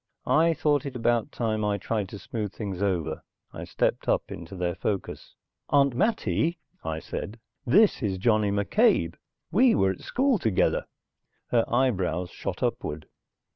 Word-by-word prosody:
I 165 Hz, +1 st, +3 dB
thought 145 Hz, -2 st, +1 dB
it 135 Hz, -, -7 dB
about 120 Hz, -1 st, +1 dB
time 110 Hz, -2 st, -1 dB
I 105 Hz, -1 st, +1 dB
tried 105 Hz, -2 st, -2 dB
to 100 Hz, -, -7 dB
smooth 105 Hz, -1 st, -4 dB
things 100 Hz, -4 st, -5 dB
over. 95 Hz, -5 st, -1 dB, 0.3 s
I -, -, -6 dB
stepped -, -, -1 dB
up -, -, +1 dB
into 85 Hz, +3 st, -8 dB
their 90 Hz, -1 st, -1 dB
focus. 95 Hz, +1 st, -4 dB, 0.3 s
"Aunt 140 Hz, -2 st, +4 dB
Mattie," 160 Hz, -, +1 dB, 0.3 s
I 80 Hz, -1 st, -3 dB
said. 105 Hz, +7 st, -6 dB, 0.3 s
"This 200 Hz, -, +5 dB
is 100 Hz, -5 st, -1 dB
Johnny 110 Hz, +1 st, +2 dB
McCabe. 100 Hz, -, +2 dB, 0.4 s
We 240 Hz, +6 st, +5 dB
were 95 Hz, 0 st, +3 dB
at 95 Hz, -, -8 dB
school 260 Hz, -3 st, +1 dB
together." 110 Hz, -, +1 dB, 0.6 s
Her 115 Hz, -2 st, +2 dB
eyebrows 95 Hz, -9 st, +1 dB
shot -, -, -5 dB
upward. 75 Hz, +1 st, -3 dB
110 Hz, 150 wpm, -27 LUFS, 95-140 Hz, 0.6 s, This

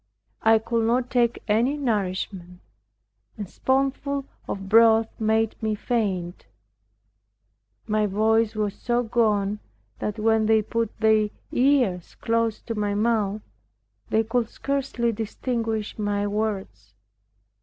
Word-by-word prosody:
I 225 Hz, 0 st, +5 dB
could 230 Hz, 0 st, -1 dB
not 245 Hz, +1 st, +1 dB
take 240 Hz, -2 st, +1 dB
any 235 Hz, +7 st, +2 dB
nourishment. 190 Hz, -7 st, -3 dB, 0.8 s
A 210 Hz, -, -4 dB
spoonful 275 Hz, +5 st, -1 dB, 0.2 s
of 195 Hz, -1 st, -5 dB
broth 225 Hz, +1 st, +5 dB
made 220 Hz, 0 st, +1 dB
me 220 Hz, -1 st, 0 dB
faint. 195 Hz, -, -2 dB, 1.4 s
My 215 Hz, 0 st, +1 dB
voice 220 Hz, +2 st, +2 dB
was 210 Hz, -2 st, -1 dB
so 240 Hz, +3 st, -1 dB
gone, 210 Hz, -3 st, +1 dB, 0.4 s
that 210 Hz, +1 st, -3 dB
when 220 Hz, 0 st, +2 dB
they 220 Hz, -1 st, +4 dB
put 230 Hz, +1 st, -1 dB
their 220 Hz, -1 st, +3 dB, 0.2 s
ears 245 Hz, -10 st, +1 dB
close 230 Hz, -1 st, -1 dB
to 230 Hz, -, -4 dB
my 205 Hz, -2 st, -1 dB
mouth, 210 Hz, -1 st, 0 dB, 0.7 s
they 220 Hz, -, +2 dB
could 230 Hz, +1 st, -1 dB
scarcely 270 Hz, -4 st, -1 dB
distinguish 225 Hz, 0 st, -3 dB
my 205 Hz, -1 st, 0 dB
words. 200 Hz, -, -3 dB
220 Hz, 115 wpm, -24 LUFS, 205-230 Hz, 1.4 s, I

